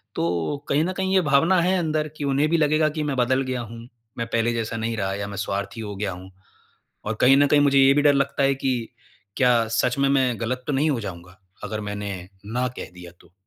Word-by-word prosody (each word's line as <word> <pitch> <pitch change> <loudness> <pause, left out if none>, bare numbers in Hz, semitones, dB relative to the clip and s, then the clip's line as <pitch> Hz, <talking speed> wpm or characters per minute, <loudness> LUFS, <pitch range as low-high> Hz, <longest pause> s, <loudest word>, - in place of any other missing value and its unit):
तो 85 - -1
कहीं 145 +2 +2
न 185 +3 -2
कहीं 190 0 -1
ये 190 - +5
भावना 165 +4 +3
है 185 +2 +2
अंदर 155 -2 -1
कि - - -5
उन्हें 140 +2 +2
भी 170 - +2
लगेगा 155 0 +2
कि 155 0 -3
मैं 145 -2 -2
बदल 130 +2 +2
गया 130 -2 -3
हूँ, 115 0 -9 0.4
मैं 115 -1 -3
पहले 115 0 0
जैसा 115 0 -3
नहीं 115 0 -3
रहा 95 -2 -1
या 100 0 -4
मैं 100 0 -7
स्वार्थी 100 +1 -3
हो 105 -2 -6
गया 100 0 -3
हूँ। 90 +1 -10 0.7
और 110 - -2
कहीं 135 +2 +6
न 145 +1 +5
कहीं 145 +1 +4
मुझे 140 -1 +4
ये 135 0 +6
भी 145 - +3
डर 145 -1 +5
लगता 140 0 0
है 135 0 +3
कि 135 -1 -1 0.6
क्या 120 -3 +3
सच 125 +1 0
में 140 0 +3
मैं 130 -4 +1
गलत 125 +2 -3
तो 150 - -1
नहीं 145 +3 +2
हो 130 -5 -1
जाऊँगा, 90 -2 -9 0.2
अगर 110 +1 -4
मैंने 100 -3 -5 0.3
ना 125 +1 0
कह - - -7
दिया 90 -1 -11
तो? 85 - -22
125 Hz, 240 wpm, -23 LUFS, 105-145 Hz, 0.7 s, कहीं